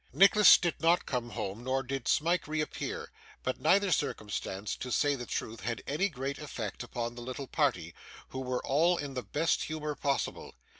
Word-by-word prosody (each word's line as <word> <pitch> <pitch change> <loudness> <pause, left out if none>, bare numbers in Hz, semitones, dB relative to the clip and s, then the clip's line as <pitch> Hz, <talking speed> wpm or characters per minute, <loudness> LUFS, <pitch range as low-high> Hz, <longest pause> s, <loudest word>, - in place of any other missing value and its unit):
Nicholas 200 +6 +8
did 175 -2 0
not 170 +2 +3
come 120 -2 -2
home 105 +1 -5
nor 130 +1 0
did 135 -1 -4
Smike 170 +2 +2
reappear; 155 0 -3 0.3
but 130 - -2
neither 200 0 +4
circumstance, 105 - -2
to 125 - -6
say 145 +2 +3
the 125 -4 -5
truth, 110 0 -4
had 115 0 -3
any 180 +8 0
great 135 -2 -4
effect 120 -9 -5
upon 120 0 -4
the 120 - -9
little 130 +3 -5
party, - - 0 0.4
who 130 - -5
were 125 -1 -2
all 165 +6 +3
in 145 -3 -4
the 125 - -3
best 160 +6 0
humour 150 -1 -3
possible. 140 -1 -2
135 Hz, 180 wpm, -31 LUFS, 120-155 Hz, 0.4 s, Nicholas